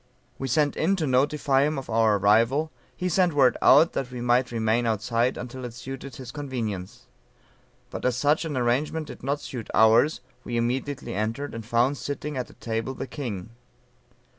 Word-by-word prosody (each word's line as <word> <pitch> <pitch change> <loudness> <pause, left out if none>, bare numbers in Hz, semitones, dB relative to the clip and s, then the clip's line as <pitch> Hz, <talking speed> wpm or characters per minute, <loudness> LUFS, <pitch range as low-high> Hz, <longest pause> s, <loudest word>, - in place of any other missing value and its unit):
"We 135 - -3
sent 145 +3 +2
in 190 +5 +2
to 170 -5 -1
notify 135 +1 +2
him 150 +1 +1
of 135 - -5
our 110 -2 +3
arrival; 115 +10 +3 0.3
he 180 - -1
sent 180 -1 +2
word 130 -4 +5
out 155 +5 +6
that 135 - -2
we 125 -1 -7
might 120 +1 +2
remain 115 +1 +1
outside 115 +3 0
until 125 +1 -7
it 120 -2 -7
suited 135 +1 -8
his 125 -2 -8
convenience. 115 -10 -5 0.9
But - - -6
as 125 -1 +1
such 145 +5 +2
an 155 -5 -3
arrangement 135 +6 0
did - - -10
not 140 +3 -2
suit 120 -6 -7
ours, 115 +7 +5 0.2
we 120 - -3
immediately 130 +4 -2
entered, 115 +8 -3
and 115 - -6
found 120 +5 +1
sitting 145 +1 -4
at 125 -2 -3
a - - -15
table 115 +3 -3
the - - -4
king. 115 -7 -6
125 Hz, 180 wpm, -26 LUFS, 115-145 Hz, 0.9 s, out